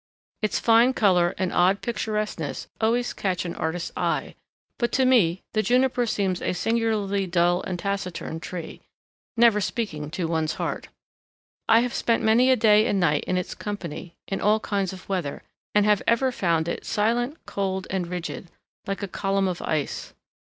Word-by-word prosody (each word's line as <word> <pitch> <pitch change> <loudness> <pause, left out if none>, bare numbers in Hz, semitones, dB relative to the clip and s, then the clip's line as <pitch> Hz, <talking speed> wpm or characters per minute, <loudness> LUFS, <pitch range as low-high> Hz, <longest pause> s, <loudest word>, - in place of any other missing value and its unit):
Its 215 -2 0
fine 235 +3 +4
color 180 -6 +3
and 185 -1 -1
odd 185 +3 +3
picturesqueness 215 - -3
always 240 +2 +1
catch 185 -3 -2
an 170 - -3
artist's 165 +2 -3
eye, - - -1 0.5
but 240 - 0
to 260 - +2
me 190 -9 +3
the 215 - +2
Juniper 250 +1 +2
seems 190 -4 -1
a - - -1
singularly 205 -1 0
dull 175 0 +2
and 185 -2 -4
taciturn 185 -4 -3
tree, 170 0 -7 0.6
never 225 -3 +5
speaking 160 -10 -3
to 165 +3 -3
one's 160 -1 0
heart. - - -3 0.8
I 225 +1 +7
have 245 0 -2
spent 230 0 +1
many 230 +4 +4
a 260 - +6
day 215 -2 +5
and 200 - +1
night 150 -5 +2
in 185 - 0
its 180 - -3
company, 175 -5 -6
in 195 - -3
all 215 +1 +3
kinds 200 -3 -1
of 185 -1 -11
weather, 180 -8 -3 0.3
and 210 -1 +5
have 210 -1 +3
ever 255 +3 +3
found 170 -8 0
it 170 - -3
silent, 240 +7 0
cold, 190 -1 -2
and 185 -2 -1
rigid, 175 0 -5 0.4
like 195 +1 -3
a - - -2
column 195 +1 0
of 180 -2 -3
ice. 155 -3 -3
195 Hz, 170 wpm, -25 LUFS, 175-225 Hz, 0.8 s, I